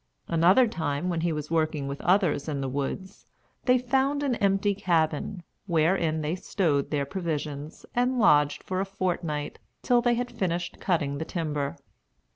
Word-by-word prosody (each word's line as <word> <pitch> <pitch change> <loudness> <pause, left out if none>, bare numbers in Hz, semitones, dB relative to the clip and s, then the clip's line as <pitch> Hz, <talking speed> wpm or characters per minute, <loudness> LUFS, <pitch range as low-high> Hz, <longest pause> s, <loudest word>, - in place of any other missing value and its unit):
Another 180 +9 +5
time, 160 -4 -2
when 170 -2 -1
he 170 0 +1
was 150 0 -4
working 155 -3 0
with 140 0 -5
others 175 -6 +2
in 145 -2 -2
the 135 - -2
woods, 145 +9 -4 0.4
they 250 0 +5
found 265 +3 +1
an 275 -3 +1
empty 200 +1 +2
cabin, 170 -1 0 0.2
wherein 165 -1 +2
they 150 +2 -1
stowed 165 -6 0
their 145 -2 0
provisions, 150 -3 -4
and 250 +1 +1
lodged 150 -10 +4
for 185 0 -2
a 195 - 0
fortnight, 175 -6 -3 0.2
till 245 -1 +4
they 240 0 +2
had 245 +1 -3
finished 175 -6 -2
cutting 145 -6 0
the 160 - -3
timber. 150 -5 -3
170 Hz, 160 wpm, -27 LUFS, 150-195 Hz, 0.4 s, Another